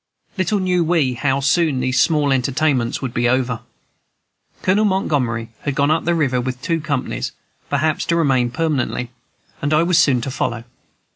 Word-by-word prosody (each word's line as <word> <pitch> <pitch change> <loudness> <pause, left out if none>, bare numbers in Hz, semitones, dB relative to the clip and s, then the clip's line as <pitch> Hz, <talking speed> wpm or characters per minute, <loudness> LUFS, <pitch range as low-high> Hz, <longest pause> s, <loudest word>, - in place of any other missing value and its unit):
Little 190 +1 0
knew 180 -2 +1
we 160 -6 +1
how 135 +2 0
soon 145 0 +2
these 130 0 +1
small 150 -4 +2
entertainments 135 -1 0
would 125 -3 -3
be 120 0 +1
over. 125 -2 0 1.0
Colonel 195 +3 +3
Montgomery 130 - 0
had 145 -2 -3
gone 140 +2 +2
up 160 - +1
the 170 +1 +2
river 135 -6 +1
with 130 +1 -3
his 125 - -12
two 165 -2 0
companies, 130 - -3 0.4
perhaps 145 +2 0
to 170 - +1
remain 135 -7 +2
permanently; 130 -4 -2 0.5
and 145 +2 +1
I 155 - +4
was 170 0 +3
soon 140 -7 +4
to 135 - -4
follow. 120 -2 -2
140 Hz, 170 wpm, -20 LUFS, 125-165 Hz, 1.0 s, I